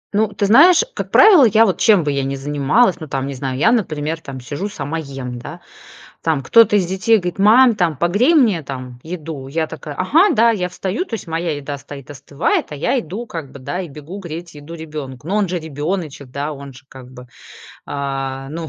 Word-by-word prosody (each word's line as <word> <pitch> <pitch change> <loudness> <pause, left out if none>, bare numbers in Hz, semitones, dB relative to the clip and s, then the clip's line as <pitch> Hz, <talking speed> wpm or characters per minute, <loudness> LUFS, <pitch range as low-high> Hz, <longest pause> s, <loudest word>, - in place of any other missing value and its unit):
Ну 220 +1 +3
ты 205 0 -2
знаешь, 335 - +6
как - - -5
правило, 380 -10 +7
я 225 0 +5
вот 190 - -1
чем 205 -7 +4
бы 145 - -1
я 140 -1 -1
ни 135 +1 -3
занималась, 145 - +1
ну 155 - -8
там 135 0 -3
не 140 - -4
знаю, 130 0 -4
я 220 +11 +3
например 160 -8 -1
там 135 -2 -8
сижу 150 +11 -5
сама 160 -2 -4
ем, 135 -4 -7
да. - - -9 0.6
Там 155 -4 0
кто-то 220 - +5
из 185 -4 +1
детей 190 +5 +2
говорит: 180 0 -4
"Мам, 235 +3 +6
там, 170 -7 0
погрей 205 - +2
мне, 215 - +3
там, 130 -2 -8
еду." 160 -5 -7
Я 160 +2 -1
такая: 150 -2 -8
"Ага, 320 - +3
да." 230 +1 +4
Я 180 -5 -1
встаю, 195 - -3
то 230 - -6
есть 205 - -6
моя 165 -1 -2
еда 145 0 -6
стоит, 140 -1 -11
остывает, 140 +2 -2
а 150 - -6
я 250 - 0
иду, 215 +7 -7
как 160 -9 -7
бы 140 - -11
да, 180 +8 -4
и 175 - -6
бегу 150 +7 -9
греть 170 -2 -8
еду 150 +3 -10
ребенку. 150 -4 -8
Но 200 +4 -1
он 205 -4 +1
же 180 0 -2
ребёночек, 155 -2 -5
да, 145 +3 -4
он 140 -2 -10
же - - -15
как 130 -1 -13
бы, 125 0 -12 0.6
а, 135 -1 -4
ну 160 0 -6
160 Hz, 220 wpm, -18 LUFS, 140-200 Hz, 0.6 s, правило